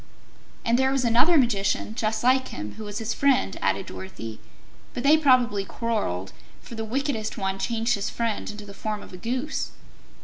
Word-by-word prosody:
"And 235 +2 +3
there 265 0 +3
was 270 -2 +1
another 245 +9 +5
Magician, 215 -4 +1
just 220 -1 -1
like 260 +1 +4
him, 105 +1 -6
who 220 - -8
was 205 0 -5
his 225 0 -2
friend," 265 -8 +2
added 95 0 +1
Dorothy, 95 +4 -7 0.6
"but 245 - -3
they 290 +3 +7
probably 250 -9 +4
quarreled, 195 - -2 0.3
for - - -12
the 225 -1 -3
wickedest 235 -1 -2
one 195 -2 -1
changed 230 +2 +1
his 200 -2 -1
friend 230 -2 -2
into 210 0 -7
the 200 - -10
form 210 +1 -4
of - - -13
a - - -7
Goose." 255 +9 -2
225 Hz, 180 wpm, -26 LUFS, 200-255 Hz, 0.6 s, they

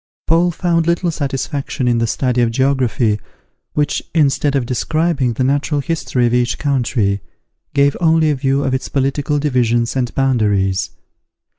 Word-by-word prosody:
Paul 170 +2 +3
found 170 -1 0
little 170 0 +1
satisfaction 140 -2 -3
in 120 -1 +2
the 115 - +1
study 125 +1 0
of 120 - +2
geography, 125 -4 +1 0.5
which, 150 -1 0
instead 145 -2 +2
of 135 -3 +1
describing 140 +1 0
the 130 - -1
natural 145 +2 0
history 140 -5 -1
of 120 - +1
each 120 -1 +1
country, 120 -8 0 0.5
gave 140 0 +3
only 160 -2 +3
a - - 0
view 135 +1 0
of 135 -2 -1
its 130 - -2
political 140 +2 0
divisions 120 -5 +1
and 125 -2 -1
boundaries. 105 -8 +1
135 Hz, 150 wpm, -17 LUFS, 120-150 Hz, 0.5 s, Paul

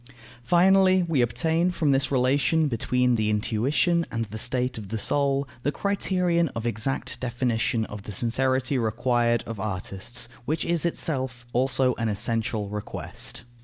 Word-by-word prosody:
Finally, 185 +5 +4
we 165 -6 +1
obtain 160 +9 +1
from 160 -5 +1
this 135 +1 +2
relation 140 +5 +2
between 125 0 +1
the 110 -1 +1
intuition 125 +11 +1
and 115 0 -2
the 110 +1 -8
state 125 0 -1
of 100 -3 -9
the 110 - -2
soul 140 +3 0
the 145 - 0
criterion 180 -3 +1
of 115 0 -4
exact 120 +4 -2
definition 120 -2 0
of 105 -1 -8
the 105 - -8
sincerity 130 +5 +1
required 120 +1 +1
of 115 -3 -6
artists, 100 +4 -3 0.2
which 155 +4 -1
is 170 0 +1
itself 130 -7 -2
also 130 0 +2
an 115 -1 0
essential 110 0 -1
request. 105 +3 -4
125 Hz, 145 wpm, -25 LUFS, 115-145 Hz, 0.2 s, Finally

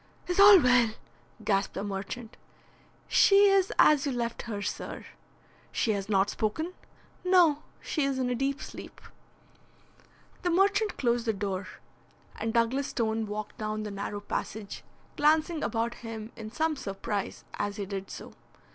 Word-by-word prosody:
"Is 360 +1 -1
all 400 -1 +10
well?" 250 -5 +4 0.5
gasped 195 -1 +1
the 195 - -3
merchant. 205 +4 -5 0.7
"She 400 0 +6
is 390 -1 +3
as 295 -3 +6
you - - 0
left 235 -2 -3
her, 205 -2 -3
sir." 205 - -5 0.7
"She 225 - +1
has 200 -1 -3
not 195 -1 +2
spoken?" 315 +12 -2 0.5
"No; 350 -5 +4 0.2
she 305 - -1
is 275 -1 -1
in 260 -1 0
a - - +2
deep 270 +3 -1
sleep." - - -10 1.4
The 355 - 0
merchant 400 +4 +2
closed 240 -2 0
the 220 - +2
door, 195 -1 -3 0.7
and 225 - -2
Douglas 235 +4 +1
Stone 220 -2 -1
walked 210 0 -6
down 215 0 -3
the 210 - -5
narrow 205 +1 -5
passage, 205 0 -5 0.3
glancing 310 +2 +3
about 230 0 -1
him 225 -1 -7
in 215 -1 -8
some 320 +4 0
surprise 200 -4 -4 0.2
as 205 0 -1
he 200 - -4
did 195 0 -5
so. - - -9
230 Hz, 150 wpm, -29 LUFS, 205-300 Hz, 1.4 s, all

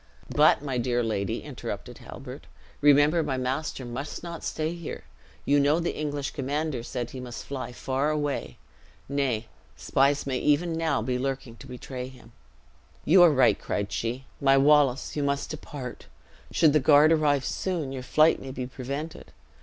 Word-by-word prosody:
"But - - +5
my 135 -4 -2
dear 120 0 0
lady," 100 -4 -2
interrupted - - -7
Halbert, - - -10 0.3
"remember 145 +3 +5
my 140 -4 -2
master 130 +1 -3
must 130 +7 -6
not 170 -1 -7
stay 160 +1 -2
here. 170 -2 -7 0.4
You 145 +1 +4
know 145 +3 +3
the 175 - -2
English 145 -2 -3
commander 145 -1 -2
said 120 0 -5
he 130 - -7
must 125 -2 -7
fly 135 -3 -5
far 135 +4 -1
away. 145 -2 -2 0.5
Nay, 130 -5 -1 0.3
spies 140 - +2
may 130 -2 -1
even 165 +3 +2
now 160 -8 0
be 125 +1 -1
lurking 135 -3 -3
to - - -12
betray 125 0 -6
him." 125 -3 -15 0.7
"You 180 +4 +6
are 175 - +9
right," 130 -4 +4
cried 100 0 -3
she. 125 +3 -3 0.2
"My 135 -1 +5
Wallace, 140 -2 +3
you 150 - -1
must 140 0 -1
depart. 140 -4 -8 0.4
Should 155 -3 +4
the 155 - +5
guard 150 +2 +6
arrive 145 -4 +2
soon, 170 -8 -2
your 135 -1 -5
flight 155 +5 +3
may 135 - -7
be 130 -1 -4
prevented. 140 +5 -6
140 Hz, 165 wpm, -27 LUFS, 125-150 Hz, 0.7 s, are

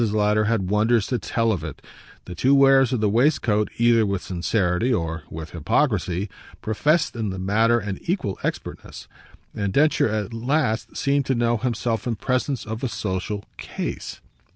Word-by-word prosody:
Lowder 105 -1 +2
had 105 -4 0
wonders 110 +1 +3
to 125 - -1
tell 115 +2 0
of 90 -7 -2
it; 75 -4 -7 0.5
the 90 - -7
two 130 +10 +3
wearers 135 -2 +5
of 125 -4 0
the 105 - +3
waistcoat, 110 -2 +2
either 115 -1 +4
with 100 -3 -1
sincerity 90 +4 0
or 80 -6 -1
with 80 +1 -7
hypocrisy, 95 - 0 0.3
professed 150 +10 +1
in 110 -3 -2
the 95 - -5
matter 110 +5 +2
an 105 -4 -4
equal 165 - -2
expertness; - - -5 0.5
and 100 -2 -2
Densher 150 -1 +3
at 105 0 -3
last 120 0 -1
seemed 140 -1 +1
to 130 - +1
know 120 0 +1
himself 115 -1 -2
in 120 - 0
presence 130 +2 -1
of 110 +2 -6
a 130 - 0
social 100 0 -3
"case." - - -5
110 Hz, 165 wpm, -23 LUFS, 100-125 Hz, 0.5 s, wearers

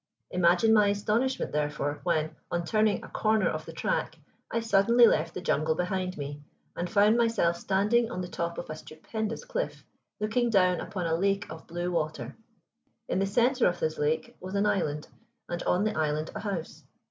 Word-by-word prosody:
Imagine 180 +5 +4
my 210 -2 +5
astonishment, 215 +6 0
therefore, 145 -1 -1
when, 155 -3 0 0.2
on 175 0 -1
turning 215 +2 +2
a - - -8
corner 215 -2 +1
of 155 0 -3
the - - -6
track, 160 0 -2 0.3
I 230 - 0
suddenly 230 +2 +5
left 165 -6 +2
the 180 - -4
jungle 160 -2 +1
behind 185 +1 -2
me, 145 0 -6 0.3
and 175 +1 -3
found 210 +1 +4
myself 225 -8 +2
standing 210 +6 +2
on 185 - -4
the 180 - -4
top 170 -1 -3
of 175 - -5
a - - -4
stupendous 220 - -5
cliff, - - -4 0.3
looking 225 +3 +1
down 185 -4 +3
upon 185 -4 -4
a 165 - 0
lake 195 +4 +1
of 160 - -10
blue 175 +1 -3
water. 155 -2 -2 0.7
In - - 0
the 195 - +1
center 245 +5 +3
of 175 0 -1
this 155 0 -1
lake 160 +12 -1
was 185 +2 -6
an 200 +1 +2
island, 150 -7 0 0.4
and 175 0 -4
on 180 +3 +2
the 215 - 0
island 155 0 -1
a - - -5
house. 195 -6 -5
185 Hz, 185 wpm, -28 LUFS, 160-215 Hz, 0.7 s, my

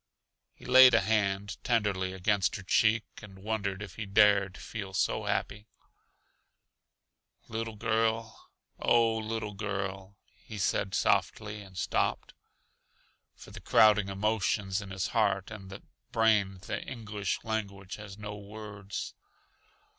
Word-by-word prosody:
He - - -16
laid 130 -1 +8
a 115 - +5
hand 100 -1 -1
tenderly 105 -6 0
against 95 +1 +1
her 95 - -6
cheek 110 +3 +3 0.2
and 100 -3 -12
wondered 100 -2 -2
if 100 - -10
he 110 - -5
dared 100 -2 +4
feel 100 -4 -7
so - - 0
happy. 105 +1 -2 1.8
"Little 115 0 -4
girl 110 0 -1 0.3
oh, 115 -1 +3
little 110 -1 -4
girl," 95 -1 -4 0.3
he 110 - -8
said 95 -1 0
softly, 105 +2 0
and 95 -2 -13
stopped. - - -1 1.0
For - - -13
the - - -10
crowding 105 -2 +5
emotions 100 -1 0
in 100 - -9
his 95 0 -3
heart 100 -3 +1
and 95 -2 -9 0.3
brain 105 -4 +2
the - - -3
English 105 -6 -4
language 100 -4 -4
has 105 -2 -10
no 105 -1 -6
words. 100 -1 -7
105 Hz, 125 wpm, -30 LUFS, 95-110 Hz, 1.8 s, laid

